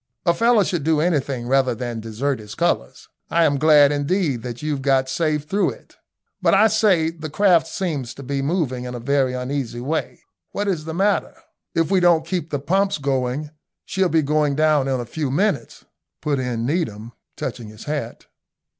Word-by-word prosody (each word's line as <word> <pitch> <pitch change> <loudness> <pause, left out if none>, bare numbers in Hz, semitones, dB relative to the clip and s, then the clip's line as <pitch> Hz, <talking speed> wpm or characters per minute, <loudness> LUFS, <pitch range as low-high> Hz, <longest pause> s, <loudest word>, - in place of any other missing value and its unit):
A 170 - +4
fellow 230 +2 +4
should 175 -5 -2
do 160 0 +2
anything 140 -7 0
rather 130 -1 +2
than 120 0 -4
desert 115 +5 -2
his 105 0 -10
colours. 165 - -1 0.2
I 170 - +3
am 140 -2 +1
glad, 150 -2 +6
indeed, 145 - 0
that 120 +2 -7
you've 150 -3 -2
got 135 -1 +2
safe 150 +2 0
through 195 +7 +1
it. - - -20 0.5
But, - - +4
I 215 +3 +5
say, 195 -7 +3
the 160 -2 -7
craft 170 -1 +3
seems 150 -12 -3
to 140 - -9
be 135 +1 -2
moving 135 -5 -1
in 125 0 -5
a - - -5
very 135 +1 +1
uneasy 125 -2 -3
way. 145 +6 -3 0.3
What 205 +1 -2
is 170 -6 -1
the 160 0 -5
matter?" 200 +3 +1 0.4
"If 165 +2 +1
we 190 - +4
don't 170 -3 +4
keep 170 -2 -3
the 145 - -1
pumps 190 +8 +1
going, 135 +1 -2 0.3
she'll 190 -1 0
be 160 -2 +2
going 150 0 +1
down 155 -2 +3
in 130 -2 0
a 120 - -4
few 145 +4 -3
minutes," 195 +10 -1 0.3
put 145 -3 -1
in 120 -3 -2
Needham, 120 - -2 0.3
touching 120 -3 -5
his 105 +1 -11
hat. 145 -6 -4
145 Hz, 190 wpm, -22 LUFS, 130-170 Hz, 0.5 s, glad